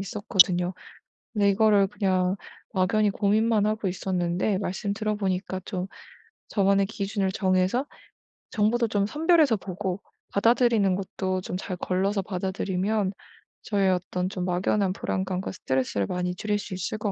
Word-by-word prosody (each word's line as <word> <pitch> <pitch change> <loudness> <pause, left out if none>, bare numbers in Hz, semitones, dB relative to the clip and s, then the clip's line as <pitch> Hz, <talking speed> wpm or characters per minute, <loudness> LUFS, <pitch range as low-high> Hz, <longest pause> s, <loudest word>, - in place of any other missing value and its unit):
있었거든요. 185 -3 +2 0.6
근데 205 -2 +3
이거를 205 -1 +4
그냥 190 -2 +1 0.4
막연히 200 +3 +2
고민만 210 +1 +2
하고 215 -2 0
있었는데 185 +1 0
말씀 200 +1 -2
들어 215 0 -1
보니까 190 -1 -2
좀 185 -2 -3 0.6
저만의 195 -1 +3
기준을 200 -2 -2
정해서 185 +8 +1 0.7
정보도 230 +2 +2
좀 205 -2 +1
선별해서 310 -4 +3
보고 190 0 -4 0.3
받아들이는 225 -3 +3
것도 185 -1 -2
좀 180 - -5
잘 185 0 -4
걸러서 195 +3 0
받아들이면 190 +1 -1 0.5
저의 195 -3 +2
어떤 180 0 -1
좀 185 -3 -3
막연한 185 +2 +1
불안감과 190 -1 -2
스트레스를 130 - -1
많이 180 0 -2
줄일 205 +2 -1
수 195 - -7
있을 185 +4 -3
것 210 -2 -1
195 Hz, 325 characters per minute, -26 LUFS, 185-210 Hz, 0.7 s, 이거를